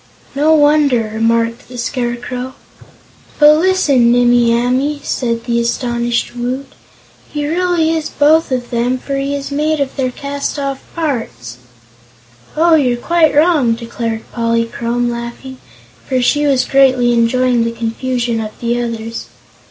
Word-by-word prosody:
"No 300 +3 +3
wonder!" 290 -7 +3
remarked 230 +1 0
the 250 0 -10
Scarecrow. 245 +1 -4 0.8
"But, 300 +1 +6
listen, 300 -10 +3
Nimmie 240 -1 +4
Amee!" 255 +5 0
said 230 -2 -2
the 235 -1 0
astonished 240 0 -1
Woot; 250 +3 -3 0.7
"he 295 -1 -3
really 340 0 +1
is 315 -2 -3
both 305 +1 +2
of 245 -2 -3
them, 245 +2 0
for 275 +2 -5
he 275 +1 -2
is 280 0 -5
made 305 +2 0
of 275 -1 -2
their 260 -2 -1
cast 280 +3 -4
off 275 -1 -3
parts." 225 - -4 1.0
"Oh, 335 +1 +4
you're 255 -6 +3
quite 325 +4 +2
wrong," 295 -6 +3
declared 230 -1 -5
Polychrome, 235 +1 -1
laughing, 235 +2 -7 0.5
for 260 -1 +1
she 290 +4 +2
was 270 -2 +2
greatly 255 -3 +3
enjoying 240 +1 +2
the 230 - -1
confusion 235 +1 -2
of 215 -1 -8
the 240 0 -1
others. 230 -1 -5
250 Hz, 135 wpm, -15 LUFS, 235-285 Hz, 1.0 s, But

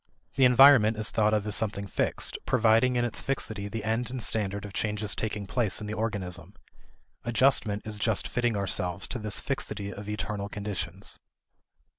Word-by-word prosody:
The 135 - +4
environment 125 -3 +7
is 110 0 -1
thought 110 -2 +2
of 105 -1 0
as 105 - -1
something 100 -2 0
fixed, 100 - 0
providing 115 +1 +3
in 120 0 +1
its 120 - -1
fixity 110 -6 -2
the 110 +2 -5
end 115 +3 -1
and 130 0 -5
standard 100 -3 -1
of 100 - -9
changes 105 -2 -2
taking 105 -2 -3
place 110 0 0
in 105 - -6
the 105 - -4
organism; 100 -4 -3 0.7
adjustment 120 -4 +2
is 105 -1 -3
just 110 -2 +1
fitting 120 -3 0
ourselves 95 -1 -1
to 125 - -4
this 105 -2 +1
fixity 105 -7 -4
of 100 +1 -8
external 105 -1 -4
conditions. 100 -3 -4
105 Hz, 170 wpm, -28 LUFS, 100-115 Hz, 0.7 s, environment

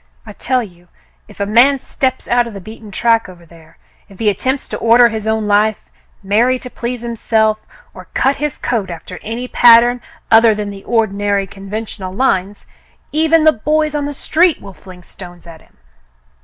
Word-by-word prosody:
I - - -10
tell 255 -2 -1
you, 175 -4 -15 0.4
if 210 - -17
a 200 - 0
man 240 +7 +4
steps 260 0 -3
out 240 0 +2
of 225 - -10
the - - -6
beaten 215 +2 -12
track 230 +1 +1
over 175 -2 -15
there 165 -1 -19 0.2
— - - -36
if 195 - -16
he 215 +1 +1
attempts 260 +7 -3
to - - -4
order 235 +1 +5
his 220 -1 -5
own 220 -1 0
life, 210 +1 +1 0.3
marry 230 +6 +2
to 250 0 -10
please 240 0 -5
himself, 220 -2 0 0.3
or - - -12
cut 270 +1 +1
his 295 0 -3
coat 220 -6 -2
after 175 +2 -9
any 235 +3 -5
pattern 240 0 +5 0.3
other 225 -1 +6
than 205 -1 -4
the 195 -1 -11
ordinary 205 -3 0
conventional 195 0 -7
lines, 200 -3 -1 0.3
— - - -38
even 320 +1 +2
the 315 0 +5
boys 305 +6 -1
on 290 -1 -2
the 290 - -5
street 335 +4 +1
will 195 - -12
fling 180 -1 -15
stones 175 -1 -13
at 165 -2 -13
him. - - -27
220 Hz, 190 wpm, -16 LUFS, 195-250 Hz, 0.4 s, other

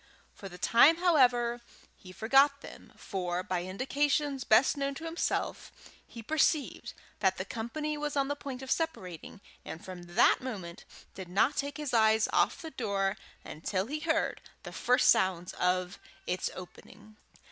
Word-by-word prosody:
For 195 - -10
the 180 - -11
time, 265 - +5
however, 245 -9 +3 0.3
he 185 - -14
forgot 275 +8 +3
them, - - -12
for, 180 -2 -3
by 180 -1 -2
indications 280 +6 -1
best 220 +5 +4
known 280 -1 -2
to 320 - -8
himself, 330 +1 -2 0.4
he 230 - -10
perceived 305 +2 0 0.2
that 190 -2 +2
the 185 - -4
company 300 +8 -4
was 295 -1 -3
on 275 -1 +2
the 285 - -2
point 270 -2 -7
of 265 - -6
separating, 195 - -4 0.2
and 160 - -9
from 175 -1 -10
that 235 - +5
moment 195 -9 -7 0.3
did 185 -2 -9
not 225 +10 +2
take 285 +1 -3
his 300 -4 -4
eyes 220 -1 +4
off - - +1
the 320 - -7
door 200 -5 -1 0.3
until 185 +5 -3
he 295 +6 -4
heard 320 0 -1 0.2
the - - -9
first 250 +2 +2
sounds 180 -2 +2
of 180 0 -1 0.3
its 180 +1 -2
opening. 210 +3 -13
235 Hz, 160 wpm, -30 LUFS, 185-285 Hz, 0.4 s, time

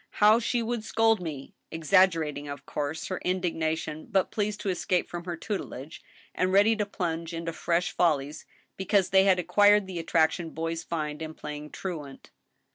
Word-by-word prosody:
how 215 +2 +5
she 240 0 0
would 230 -1 -2
scold 225 -1 +2
me! 150 -6 -6
" - - -49
— - - -51
exag 185 +4 +5
gerating, 150 -4 -4
of 140 - -8
course, 150 +2 -3
her 185 - -3
indignation, 160 -4 -2
but 190 -2 +1
pleased 210 -1 -2
to 200 - -3
escape 180 -1 0
from 175 0 -7
her 175 -2 -4
tutelage, 165 - -6 0.3
and 185 0 0
ready 205 +4 +5
to 210 -2 -2
plunge 165 -3 -3
into 165 0 -4
fresh 170 +2 0
follies, 150 -3 0 0.3
because 190 0 +1
they 190 0 +6
had 190 -2 +5
acquired 205 +4 +4
the 185 -2 -5
attraction 165 0 +1
boys 165 +1 -3
find 150 -2 -4
in 160 0 -6
playing 150 0 -7
truant. 150 -8 -7
175 Hz, 180 wpm, -27 LUFS, 160-195 Hz, 0.3 s, they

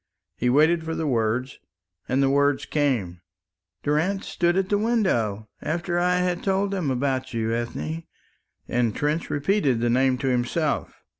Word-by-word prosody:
He 125 - 0
waited 160 +5 +4
for 165 0 -3
the 160 - -2
words, 120 0 0 0.5
and 135 +2 +2
the 135 - +3
words 140 0 +2
came. 115 - -1 0.6
"Durrance 165 +7 0
stood 175 +1 +1
at 190 0 0
the 205 - +2
window, 120 - 0
after 175 +2 -1
I 180 +1 +2
had 180 -1 0
told 195 +1 0
them 185 -7 -1
about 130 -1 -1
you, 115 0 0
Ethne," 155 +8 -3 0.6
and 120 -3 0
Trench 150 +3 -1
repeated 145 - +1
the 120 0 +1
name 130 +1 +3
to 135 - -3
himself. 130 +5 -1
145 Hz, 155 wpm, -24 LUFS, 125-175 Hz, 0.6 s, waited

